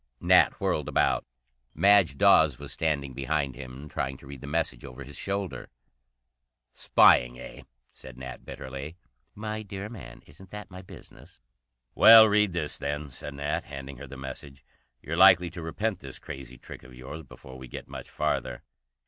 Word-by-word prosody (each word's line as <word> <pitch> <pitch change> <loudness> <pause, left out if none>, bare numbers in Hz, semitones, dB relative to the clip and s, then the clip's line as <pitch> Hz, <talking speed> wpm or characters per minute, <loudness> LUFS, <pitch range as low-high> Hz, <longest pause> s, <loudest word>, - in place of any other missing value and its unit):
Nat - - +5
whirled - - -1
about. - - +1 0.5
Madge 95 -4 +4
Dawes 80 -4 +5
was - - -7
standing 70 -4 -1
behind 70 0 -2
him, 65 +3 -9
trying 65 -2 -4
to - - -16
read 70 -1 -10
the 70 - -8
message 80 +2 -2
over 65 +2 -9
his 70 +2 -12
shoulder. 100 -2 -4 1.0
"Spying, - - +4
eh?" - - -10 0.3
said 65 -2 -13
Nat 65 -1 -9
bitterly. 70 +5 -8 0.4
"My 110 +1 -5
dear 100 0 -7
man, 115 -3 -11
isn't 90 +7 -16
that 105 0 -9
my 90 0 -9
business?" 90 - -15 0.5
"Well, 110 -1 +9
read 105 -1 +3
this, 80 -4 -3
then," 75 0 -4
said 70 +3 -8
Nat, 70 +1 -3
handing 70 -1 -9
her - - -9
the 70 - -10
message. 65 0 -9 0.4
"You're 85 +3 -4
likely 90 -2 +6
to 85 - -8
repent 95 +5 -3
this 70 -2 -10
crazy 65 -2 -9
trick - - -11
of 65 0 -15
yours 65 +6 -8
before 65 -2 -13
we 65 - -10
get - - -9
much - - -9
farther." 60 -1 -2
70 Hz, 165 wpm, -27 LUFS, 65-90 Hz, 1.0 s, Well